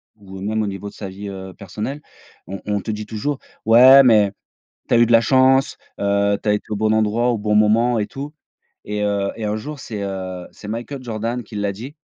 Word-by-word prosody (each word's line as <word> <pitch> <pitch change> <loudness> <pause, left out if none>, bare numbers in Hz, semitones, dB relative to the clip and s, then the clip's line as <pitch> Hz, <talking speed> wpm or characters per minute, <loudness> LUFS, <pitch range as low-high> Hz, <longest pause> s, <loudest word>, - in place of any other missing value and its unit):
ou 95 -3 -12
heu, - - -9
même 110 +2 -1
au 105 - -1
niveau 100 0 -6
de - - -17
sa 100 - -7
vie, 100 +2 -8
heu, 95 -1 -8
personnelle, 105 +9 -6 0.5
on 95 +2 -7
on 105 -1 -1
te 110 - -4
dit 105 0 -5
toujours: 120 +7 -3 0.3
«Ouais, 125 +5 +8
mais 105 -5 +5 0.6
tu - - +1
as 120 - +5
eu 120 - +5
de - - -1
la 115 -1 +6
chance, 130 +2 +3 0.2
heu, 100 0 +1
tu - - -5
as 105 - +4
été 105 - -2
au 105 - -2
bon 110 +1 +1
endroit 110 +3 +1
au 115 - -2
bon 105 0 0
moment 115 +3 +3
et 105 - 0
tout» 140 +6 -7 0.5
et 105 0 -3
heu, 100 -1 0
et 115 - -5
un 105 +1 -1
jour 145 +7 -7
c'est, 105 -6 -6
heu, 95 -2 -5
c'est 105 - -12
Michael 120 +5 -5
Jordan 115 +1 -3
qui 110 - -12
l'a 100 -1 -1
dit, 125 +9 -9
105 Hz, 240 wpm, -20 LUFS, 100-120 Hz, 0.6 s, Ouais